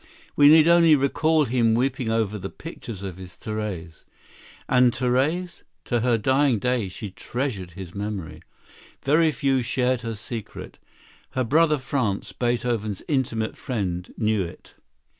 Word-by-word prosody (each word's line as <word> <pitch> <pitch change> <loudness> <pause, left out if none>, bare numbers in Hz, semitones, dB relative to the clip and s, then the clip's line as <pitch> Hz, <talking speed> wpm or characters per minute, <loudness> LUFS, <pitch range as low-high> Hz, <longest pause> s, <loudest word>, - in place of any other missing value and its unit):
We 145 - +7
need 155 +1 +7
only 170 -2 +6
recall 155 +3 +2
him 115 -2 +2
weeping 125 -1 0
over 110 -2 0
the 95 +1 -5
picture 115 - -8
of 95 -1 -8
his 95 -1 -10
Therese. 100 -7 -5 0.6
And 125 -1 +4
Therese? 135 +9 0 0.2
To 120 - 0
her 120 0 +2
dying 130 +2 +2
day 120 -2 0
she 100 +2 -7
treasured 100 -5 -4
his 90 0 -9
memory. 100 -5 -5 0.6
Very 155 +3 +4
few 135 -3 +1
shared 125 0 0
her 115 -1 -4
secret. 110 +1 -8 0.5
Her 130 - 0
brother 150 +5 +3
Franz, 130 -7 -2
Beethoven's 120 -4 -1
intimate 120 -6 -1
friend, 90 -7 -3
knew 110 -2 +1
it. 85 - -10
120 Hz, 140 wpm, -24 LUFS, 105-135 Hz, 0.6 s, We